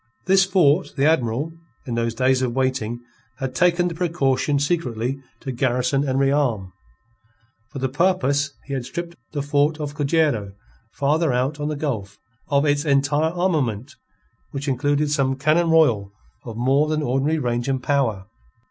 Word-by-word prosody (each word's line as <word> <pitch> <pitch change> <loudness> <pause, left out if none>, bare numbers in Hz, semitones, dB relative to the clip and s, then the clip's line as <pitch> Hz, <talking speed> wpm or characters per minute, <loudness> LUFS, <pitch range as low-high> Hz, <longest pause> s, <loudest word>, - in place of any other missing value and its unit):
This 190 0 +5
fort 185 -3 +2
the 140 - +2
Admiral, 145 0 +1 0.3
in 120 - -4
those 115 0 -1
days 130 +1 +2
of 125 -2 -1
waiting, 130 -3 -1 0.4
had 135 -2 -4
taken 175 +4 +3
the 175 - -3
precaution 150 -5 0
secretly 135 -5 -1 0.2
to 135 - -4
garrison 125 +2 0
and 130 - 0
rearm. 135 -9 +1 1.0
For 130 - -9
the 130 0 0
purpose 140 -2 +1
he 140 - -6
had 130 -2 -2
stripped 170 +6 -6 0.2
the 145 -2 -2
fort 145 +2 +1
of 145 -1 -4
Cojero, 145 -9 0 0.4
farther 150 +2 +1
out 130 +4 -1
on 145 - -2
the 155 - -2
gulf, 110 -10 -4 0.3
of 140 -1 +2
its 145 0 +2
entire 145 +1 +2
armament, 145 - -1 0.6
which 140 +1 -5
included 145 +2 +1
some 135 -2 +1
cannon 155 +5 +2
royal 120 -12 +3 0.3
of 115 -2 -7
more 135 +5 +2
than 155 0 -1
ordinary 135 +5 +1
range 120 -3 -1
and 130 -2 -1
power. 115 -10 0
140 Hz, 155 wpm, -22 LUFS, 125-155 Hz, 1.0 s, This